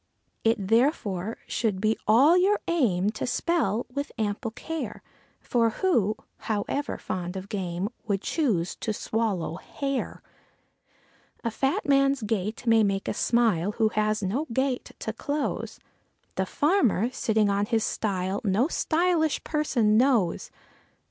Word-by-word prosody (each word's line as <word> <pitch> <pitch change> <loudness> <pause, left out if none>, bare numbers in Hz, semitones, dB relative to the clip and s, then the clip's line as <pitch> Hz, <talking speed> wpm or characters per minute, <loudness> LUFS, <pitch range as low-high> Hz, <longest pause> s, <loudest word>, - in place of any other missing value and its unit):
It 225 +1 +3
therefore 225 - +1
should 210 -5 -1
be 215 +2 +2
all 265 +10 +6
your 385 +3 +3
aim 210 - +2
to 215 - -4
spell 245 - 0
with 285 +1 -3
ample 215 +2 -2
care; 325 +8 -6 0.4
For 230 -2 +1
who, 225 - +1 0.2
however 225 +7 -2
fond 180 0 -4
of 190 +1 -7
game, 185 -2 -2 0.2
would 200 -2 -1
choose 210 - 0
to 215 - -2
swallow 205 -7 -2
hair? 275 +3 -4 1.2
A 230 - -1
fat 270 +6 -1
man's 275 -2 +3
gait 215 +1 -2
may 225 -1 +5
make 195 -1 0
us - - -2
smile, 210 -6 +2
who 220 -1 +2
has 215 -1 0
no 250 +12 -1
gate 260 +1 -1
to 220 - -4
close; 285 +5 -3 0.5
The 190 0 -1
farmer, 255 - +2
sitting 220 -4 +1
on 200 +1 0
his 225 -2 +1
stile 190 -1 -1
no 210 +4 +2
_sty_lish 330 -2 +1
person 245 -9 +2
knows. 235 -8 +2
225 Hz, 135 wpm, -26 LUFS, 205-275 Hz, 1.2 s, all